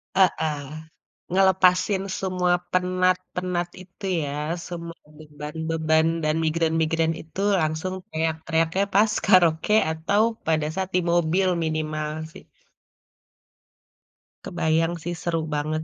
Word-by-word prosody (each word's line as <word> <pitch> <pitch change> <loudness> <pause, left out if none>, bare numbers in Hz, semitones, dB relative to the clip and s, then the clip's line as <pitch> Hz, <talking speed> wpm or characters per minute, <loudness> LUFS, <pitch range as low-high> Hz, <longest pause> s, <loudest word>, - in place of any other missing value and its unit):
Heeh, 160 -5 +2 0.7
ngelepasin 190 +1 +3 0.2
semua 180 -2 +1 0.2
penat-penat 185 -1 0
itu 185 +2 -11 0.2
ya, 140 - -3 0.4
semua 170 -1 -7 0.2
beban-beban 160 +1 -1 0.2
dan 155 0 +1
migrain-migrain 160 0 +1
itu 160 +4 -7 0.2
langsung 155 +4 -2 0.2
teriak-teriaknya 160 +3 0
pas 210 +2 +4
karaoke 180 -1 +4 0.2
atau 165 +6 +1 0.3
pada 155 -2 +2
saat 190 0 -2
di 180 - +3
mobil 175 +2 +2 0.2
minimal 155 -1 -2 0.2
sih. - - -13 2.0
Kebayang 165 -1 0
sih 175 - -3
seru 170 -1 -1
banget, 155 +1 -1
165 Hz, 100 wpm, -24 LUFS, 160-185 Hz, 2.0 s, pas